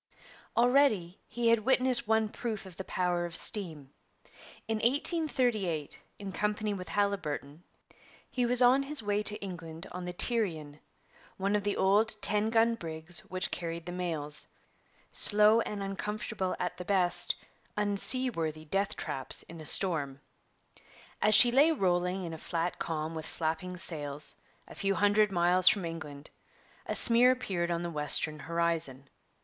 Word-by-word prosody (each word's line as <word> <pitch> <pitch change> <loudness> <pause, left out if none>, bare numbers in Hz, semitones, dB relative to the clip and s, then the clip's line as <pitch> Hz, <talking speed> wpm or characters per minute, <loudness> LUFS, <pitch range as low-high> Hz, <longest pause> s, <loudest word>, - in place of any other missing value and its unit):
Already 235 -8 +2
he 240 -1 -1
had 230 0 +4
witnessed 255 0 +1
one 220 0 +2
proof 215 -2 -5
of 185 -2 -12
the 190 - -6
power 180 -2 -1
of 170 - -10
steam. 160 -9 -3 0.8
In 225 0 -1
1838, 240 - -1 0.2
in 200 -1 -7
company 210 +1 -2
with 185 -2 -7
Haliburton, 165 -7 -2 0.7
he 250 - -2
was 245 +1 +3
on 255 +3 +5
his 275 -2 0
way 205 0 0
to 210 0 -1
England 165 -4 -8
on 180 0 -6
the 180 - -5
Tyrian, 170 - -1 0.6
one 195 +2 0
of 205 - -1
the 205 0 -2
old 210 +3 +2
ten 210 +1 +1
gun 230 +1 +3
brigs 165 -4 -3
which 185 0 -2
carried 170 -1 -4
the 175 - -6
mails, 160 -5 -3 0.6
slow 210 +2 +4
and 205 -3 -5
uncomfortable 195 0 -4
at 180 - -3
the 180 - -7
best, 180 -3 +1 0.4
unseaworthy 200 -6 +1
death 195 +5 -1
traps 135 -1 -3
in 165 -1 -11
a 155 - -1
storm. 145 -8 +4 1.0
As 215 0 +5
she 240 +3 +7
lay 285 +6 +5
rolling 180 - 0
in 165 -2 -6
a 160 - -8
flat 170 +2 -3
calm 155 0 -3
with 160 -1 -6
flapping 165 +3 -4
sails, 150 -5 -2 0.3
a - - -12
few 195 0 -1
hundred 205 +1 +3
miles 180 0 +4
from 195 -4 +5
England, 155 -3 -8 0.6
a - - -2
smear 240 +1 +8
appeared 195 -9 -1
on 170 0 -2
the 170 - -4
western 150 0 0
horizon. 165 -3 -1
190 Hz, 150 wpm, -30 LUFS, 165-215 Hz, 1.0 s, smear